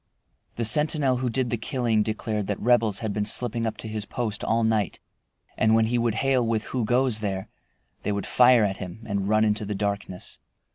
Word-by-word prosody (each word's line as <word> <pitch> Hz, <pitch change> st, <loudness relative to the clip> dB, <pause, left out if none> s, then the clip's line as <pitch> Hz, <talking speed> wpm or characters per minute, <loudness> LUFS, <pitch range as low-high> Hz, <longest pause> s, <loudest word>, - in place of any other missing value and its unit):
The 115 Hz, -, -2 dB
sentinel 145 Hz, +2 st, +4 dB
who 125 Hz, 0 st, -1 dB
did 125 Hz, +1 st, -1 dB
the 120 Hz, -, 0 dB
killing 115 Hz, -2 st, 0 dB
declared 110 Hz, -1 st, -2 dB
that 105 Hz, -, -3 dB
Rebels 115 Hz, -4 st, +2 dB
had 105 Hz, -, -2 dB
been 105 Hz, 0 st, -2 dB
slipping 115 Hz, -1 st, -1 dB
up 110 Hz, -, -4 dB
to -, -, -7 dB
his 110 Hz, -1 st, -4 dB
post 110 Hz, -4 st, -3 dB
all 115 Hz, +1 st, +1 dB
night, 110 Hz, -5 st, 0 dB, 0.6 s
and 110 Hz, 0 st, +3 dB
when 115 Hz, 0 st, +4 dB
he 120 Hz, +2 st, 0 dB
would 115 Hz, -2 st, 0 dB
hail 130 Hz, +1 st, +1 dB
with 115 Hz, -1 st, -1 dB
"Who 125 Hz, -1 st, -3 dB
goes 125 Hz, -1 st, +2 dB
there?" 95 Hz, -3 st, -4 dB, 0.5 s
they -, -, -2 dB
would 100 Hz, 0 st, -2 dB
fire 125 Hz, -2 st, +5 dB
at 100 Hz, -1 st, -1 dB
him 95 Hz, +5 st, -8 dB
and 100 Hz, -2 st, -2 dB
run 110 Hz, 0 st, +3 dB
into 105 Hz, 0 st, 0 dB
the 105 Hz, 0 st, -4 dB
darkness. 100 Hz, -2 st, -4 dB
110 Hz, 205 wpm, -25 LUFS, 105-120 Hz, 0.6 s, fire